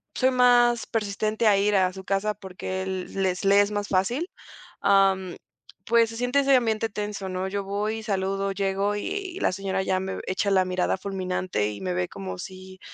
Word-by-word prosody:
soy 260 0 +3
más 245 -1 +4
persistente 215 +1 -1
a 205 -2 +5
ir 205 0 +3
a 185 -1 +2
su 190 0 -9
casa 200 +2 0
porque 190 -1 -6
él 190 -1 -4
les 185 +1 -1
le 200 +1 +6
es 205 +1 0
más 205 -1 -2
fácil, 240 - 0 0.5
am, 195 -2 +3 0.5
pues 230 0 +4
se 225 - -8
siente 245 +3 +1
ese 275 -1 +4
ambiente 225 -2 +1
tenso, 205 -2 -4
¿no? 185 +1 -2
Yo 200 +1 -3
voy, 210 +3 -2
saludo, 195 -1 -1
llego 195 +1 0
y 380 - -4
la - - +2
señora 190 0 -2
ya 190 -1 0
me 190 0 -4
v - - -5
echa 195 +2 0
la 190 -1 +4
mirada 185 +1 0
fulminante 185 - -2
y 100 -1 -8
me 90 -1 -2
ve 90 0 0
como 95 -1 -7
si, 185 - -10
195 Hz, 195 wpm, -25 LUFS, 190-215 Hz, 0.5 s, le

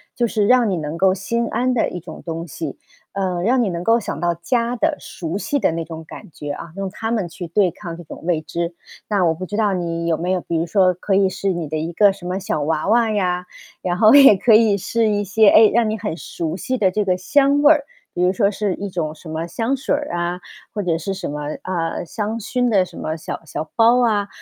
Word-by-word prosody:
就 240 -1 +1
是 210 -2 0
让 245 -2 +4
你 190 - 0
能 155 -1 -4
够 185 +1 +4
心 230 +5 -2
安 255 +1 0
的 235 - +1
一 180 - -6
种 - - -10
东 165 0 -4
西， 155 -2 -6 0.4
呃， 185 -3 -1
让 245 +4 +3
你 205 - 0
能 175 0 -4
够 230 +1 +4
想 - - -5
到 175 0 +1
家 235 +7 -1
的 230 - 0
熟 170 +1 -5
悉 285 +7 -1
的 255 - +1
那 165 0 -3
种 160 0 -8
感 - - -11
觉 145 - -7
啊， 160 +2 -8
用 195 -1 -3
它 225 +3 -4
们 210 -7 -1
去 170 +1 -7
对 180 +1 +2
抗 170 -5 -8
那 175 - -10
种 150 - -11
未 170 -3 +1
知。 170 +2 -4 0.3
那 205 -3 +1
我 165 -2 +3
不 185 +3 -6
知 205 - -6
道 210 -2 +2
你 170 -2 -2
有 165 -1 +1
没 175 +3 -3
有 180 - -1
比 170 - -2
如 165 - 0
说 185 +1 +3
可 190 +2 -1
以 195 -1 +4
是 195 +1 -2
你 165 -4 -4
的 155 - -2
一 165 +2 -3
个 200 +3 +5
什 195 -2 -11
么 185 - -2
小 190 -6 -2
娃 155 +4 -1
娃 230 0 +4
呀， 180 -3 0 0.4
然 175 -1 -1
后 215 +2 +6
也 275 -7 +9
可 225 +4 +3
以 220 -2 +5
是 225 +4 0
一 205 -1 +1
些， 210 +2 +3
哎， 215 +1 +7
让 230 -1 +3
你 220 - -2
很 205 -6 -4
熟 165 0 -4
悉 255 +5 -2
的 190 -4 +2
这 210 +1 0
个 185 - +2
香 280 +9 +3
味 295 - +7
儿， 290 -2 -1 0.3
比 175 - -2
如 180 - +4
说 200 +1 +2
是 205 -2 -2
一 200 - -5
种 160 -4 -3
什 160 +1 -12
么 160 +2 -3
香 230 +9 -1
水 270 - 0
儿 290 0 -4
啊， 175 +1 -2 0.3
或 205 -2 -2
者 165 -2 0
是 195 +4 -3
什 - - -5
么， 150 +1 -5 0.2
啊， 170 -3 -3
香 215 +5 -3
薰 245 +3 -1
的 195 -4 +4
什 175 - -13
么 155 - -3
小 155 - -6
小 155 0 -5
包 230 +2 +5
啊， 205 -3 +1
190 Hz, 275 characters per minute, -20 LUFS, 170-220 Hz, 0.4 s, 也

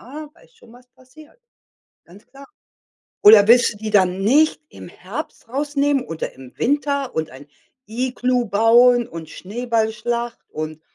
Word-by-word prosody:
ja, 295 +4 -10
weißt 470 +7 -25
schon, 235 - -20
was 250 +1 -19
passiert. 295 - -20 0.7
Ganz 190 +5 -18
klar. 275 +1 -15 0.8
Oder 210 0 +8
willst 240 0 +5
du - - -15
die 215 0 -5
dann 190 -2 +2
nicht 295 +11 +2
im - - -13
Herbst - - -9
rausnehmen 285 0 -1
oder 165 -1 -6
im 130 -1 -14
Winter 280 0 -1
und 160 0 -2
ein 135 +2 -14 0.4
Iglu 250 +2 -1
bauen 235 +3 +4
und 165 -6 -10
Schneeballschlacht 230 +2 -3
und 155 0 -7
240 Hz, 140 wpm, -20 LUFS, 205-270 Hz, 0.8 s, Oder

